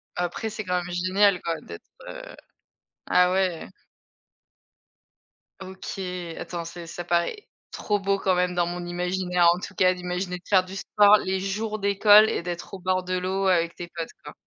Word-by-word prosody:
Après 180 +6 -3
c'est 215 0 -5
quand 180 -1 -1
même 175 0 -7
génial 185 +1 +2
quoi 165 -1 -3
d'être, 85 - -10 0.2
heu - - -7 0.9
ah 180 0 +4
ouais. 185 -3 0 1.9
OK, 190 +1 -8 0.4
attends 170 -1 -5
c'est 170 0 -9
ça 175 +1 -6
paraît 175 - -1 0.2
trop 205 -1 -1
beau 195 0 0
quand 190 -1 +1
même 180 0 0
dans 175 -1 +2
mon 175 0 -5
imaginaire 180 0 0
en 180 - -5
tout - - -8
cas 185 -1 +4
d'imaginer 180 0 -4
de 175 - -18
faire 190 -2 +4
du 190 +1 -9
sport 205 +1 +5
les 190 -1 -2
jours 215 +3 -3
d'école 205 +2 +6
et - - -1
d'être 175 +1 -6
au - - -9
bord 185 0 0
de 185 0 -2
l'eau 190 +2 -1
avec 170 -2 +2
tes 175 0 -8
potes, 165 -1 -4 0.2
quoi. - - -9
185 Hz, 180 wpm, -25 LUFS, 175-195 Hz, 1.9 s, d'école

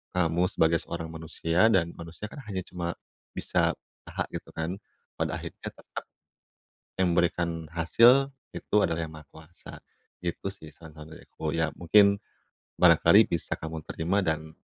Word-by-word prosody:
kamu 85 0 +2
sebagai 80 +1 +3
seorang 80 -1 -5
manusia, 80 +4 +1
dan 85 -3 +2
manusia 85 +5 -7
kan - - -9
hanya 95 -2 -3
cuma 85 -2 -4 0.4
bisa - - +1 0.4
aha - - -2
gitu, - - -6
kan? 80 +4 -3 0.4
Pada - - -1
akhirnya - - -8
tetap - - -9 1.0
yang 90 -2 +3
memberikan 85 -1 0
hasil 120 +11 +5 0.3
itu - - -2
adalah 80 0 -1
Yang 80 - -8
Maha 75 - -18
Kuasa. 80 +2 -13 0.5
Gitu 85 +2 -3
sih, 80 -6 -12
saran-saran 80 -1 -13
dari - - -14
aku. 80 - -4
Ya, 80 -1 +1
mungkin 100 +3 +5 0.6
barangkali 90 +4 +7
bisa 85 - -1
kamu 80 0 -6
terima, 85 +5 -1
dan, 80 -1 -2
85 Hz, 150 wpm, -28 LUFS, 80-90 Hz, 1.0 s, barangkali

